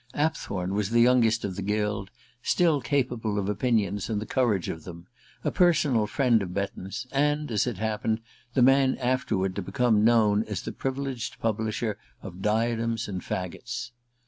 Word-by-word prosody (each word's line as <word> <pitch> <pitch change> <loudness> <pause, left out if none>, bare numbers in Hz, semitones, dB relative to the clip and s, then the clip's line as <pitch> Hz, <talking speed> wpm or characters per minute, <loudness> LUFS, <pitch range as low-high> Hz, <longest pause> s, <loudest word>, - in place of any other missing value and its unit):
Apthorn 100 - -1
was 100 -1 0
the 120 +1 +3
youngest 115 -2 +4
of 95 -2 -4
the 100 - -4
guild, 105 0 -1 0.3
still 160 -2 +2
capable 120 -5 -1
of 100 -1 -1
opinions 105 -1 0
and 110 -2 0
the 105 - -5
courage 110 -10 +1
of 80 - -5
them, 85 0 -10 0.4
a - - 0
personal 145 -11 +3
friend 120 -1 +3
of 90 -2 -5
Betton's, 100 +1 -4
and, 145 0 +1
as 110 +2 +1
it 120 - -3
happened, 110 0 -1 0.4
the 130 - +5
man 135 0 +4
afterward 120 -7 0
to - - -1
become 105 +3 +2
known 110 -2 +4
as 105 -4 -4
the - - -4
privileged 135 -2 -4
publisher 110 -1 -1 0.2
of 95 -2 -8
"Diadems 115 +1 0
and 95 -3 -4
Faggots." 90 +5 -5
110 Hz, 165 wpm, -27 LUFS, 100-125 Hz, 0.4 s, the